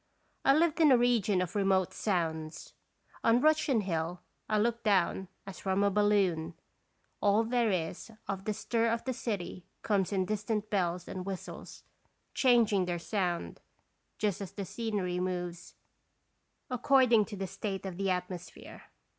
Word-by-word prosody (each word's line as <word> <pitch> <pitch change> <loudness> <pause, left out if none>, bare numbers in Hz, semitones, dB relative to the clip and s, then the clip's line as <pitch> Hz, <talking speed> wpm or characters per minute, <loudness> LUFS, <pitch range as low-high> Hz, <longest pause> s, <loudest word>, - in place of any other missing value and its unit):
I 275 - +5
lived 330 +1 +2
in 310 -3 +6
a 255 - +7
region 220 -6 +2
of 180 +1 -7
remote 195 -2 +2
sounds. 160 -5 -2 0.5
On 230 +1 +5
Russian 300 -5 +3
Hill 170 -2 -2 0.3
I 215 - +2
looked 235 +2 0
down 190 -2 +2 0.2
as 195 -1 -9
from 190 +1 0
a 200 - +3
balloon; 190 -5 +2 0.7
all 205 +2 +4
there 235 0 +1
is 180 +1 -2 0.2
of 195 0 -4
the 215 - 0
stir 230 +2 0
of 230 0 -1
the 260 - -2
city 200 -7 -4 0.2
comes 200 -3 +1
in 190 -2 +1
dis 210 +1 -2
tant 210 -1 -2
bells 180 -3 0
and 185 - -5
whistles, 190 -1 -7 0.5
changing 230 -7 +4
their 175 -1 -2
sound, 175 -1 -2 0.6
just 205 -2 -1
as 195 - -6
the 200 - -5
scenery 200 -4 -2
moves, 180 -1 -4 1.0
according 250 -3 +4
to 205 - -8
the 195 - -3
state 195 +1 -5
of 185 -2 -5
the 195 0 0
atmosphere. 180 -1 -5
200 Hz, 155 wpm, -31 LUFS, 180-225 Hz, 1.0 s, a